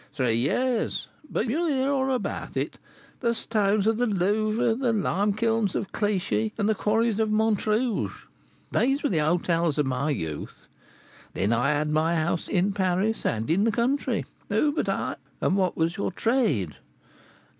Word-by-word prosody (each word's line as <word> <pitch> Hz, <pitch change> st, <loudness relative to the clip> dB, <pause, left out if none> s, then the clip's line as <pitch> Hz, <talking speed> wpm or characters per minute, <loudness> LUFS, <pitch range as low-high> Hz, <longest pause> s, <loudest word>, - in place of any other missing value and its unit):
"Three 125 Hz, -5 st, +1 dB
years; 225 Hz, -, 0 dB, 0.2 s
but -, -, -1 dB
you 265 Hz, +8 st, 0 dB
will 345 Hz, -, +1 dB
hear 275 Hz, -2 st, +1 dB
all 265 Hz, -1 st, +1 dB
about 255 Hz, -, -3 dB
it: -, -, -3 dB, 0.4 s
the 235 Hz, -2 st, +1 dB
stones 210 Hz, -3 st, +1 dB
of 225 Hz, +1 st, +2 dB
the 245 Hz, -, +2 dB
Louvre, 215 Hz, +4 st, +1 dB
the 245 Hz, +1 st, 0 dB
lime 205 Hz, -1 st, +1 dB
kilns 225 Hz, -1 st, 0 dB
of 195 Hz, -, -3 dB
Clichy, 210 Hz, +1 st, 0 dB
and 210 Hz, -2 st, +1 dB
the 220 Hz, -, +3 dB
quarries 220 Hz, +1 st, +1 dB
of 220 Hz, -1 st, +2 dB
Montrouge, 220 Hz, +2 st, 0 dB, 0.5 s
these 270 Hz, +3 st, +1 dB
were 290 Hz, -, +2 dB
the 165 Hz, -, +1 dB
hôtels 165 Hz, 0 st, +1 dB
of 150 Hz, -, +2 dB
my 135 Hz, +3 st, -1 dB
youth. 80 Hz, -, -4 dB, 0.7 s
Then 100 Hz, +5 st, +1 dB
I 125 Hz, +4 st, +2 dB
had 150 Hz, +1 st, 0 dB
my 160 Hz, +2 st, +2 dB
house 165 Hz, +1 st, 0 dB
in 195 Hz, +1 st, +1 dB
Paris 195 Hz, +3 st, 0 dB
and 110 Hz, 0 st, -1 dB
in 190 Hz, +5 st, +3 dB
the 225 Hz, -, +3 dB
country. 245 Hz, +1 st, 0 dB, 0.2 s
Who 285 Hz, +8 st, +2 dB
but -, -, -1 dB
I -, -, -2 dB
" -, -, -36 dB
"And 185 Hz, -, +1 dB
what 185 Hz, -3 st, +1 dB
was 165 Hz, +1 st, 0 dB
your 200 Hz, -, -1 dB
trade?" 180 Hz, -, 0 dB
210 Hz, 175 wpm, -26 LUFS, 165-230 Hz, 0.7 s, the